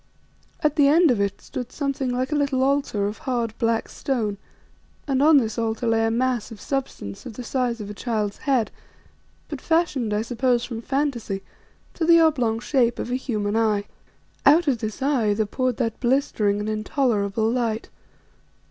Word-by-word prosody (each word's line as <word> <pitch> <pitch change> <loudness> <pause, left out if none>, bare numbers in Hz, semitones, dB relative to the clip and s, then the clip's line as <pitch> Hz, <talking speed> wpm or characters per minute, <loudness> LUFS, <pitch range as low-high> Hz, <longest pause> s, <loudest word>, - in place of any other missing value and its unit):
At 300 0 +1
the 285 -2 +6
end 320 +1 +5
of 220 -5 +1
it 200 -1 -2
stood 250 -1 -6
something 275 -2 -2
like 255 +3 -1
a - - +1
little 280 -3 +1
altar 275 -7 +1
of 210 +2 -4
hard, 235 -4 -2
black 230 -1 +1
stone, 220 -7 -2 0.7
and 270 -1 +1
on 305 +1 +7
this 225 -3 0
altar 225 +1 -1
lay 225 -1 +2
a - - +1
mass 245 0 0
of 225 -3 -10
substance 265 - -4
of 240 - -8
the 250 - -7
size 245 -1 -1
of 210 - -6
a 205 - -6
child's 210 -2 -2
head, 245 -6 +2 0.8
but - - -6
fashioned, 320 -9 +1
I 210 +1 0
suppose 245 +1 +1
from 230 -2 -6
fantasy, 245 -7 -2 0.5
to 335 - -3
the 335 +1 +6
oblong 250 -9 +2
shape 240 -2 +1
of 245 - -4
a - - +1
human 215 -5 -2
eye. 215 -2 +2 0.6
Out 315 +4 +5
of 255 -5 +2
this 220 +3 -4
eye 240 -8 +2
there 220 +1 +1
poured 255 +3 -1
that 230 -4 -2
blistering 240 -6 +1
and 210 - -3
intolerable 215 -2 0
light. 230 -2 -1
240 Hz, 180 wpm, -24 LUFS, 220-270 Hz, 0.8 s, on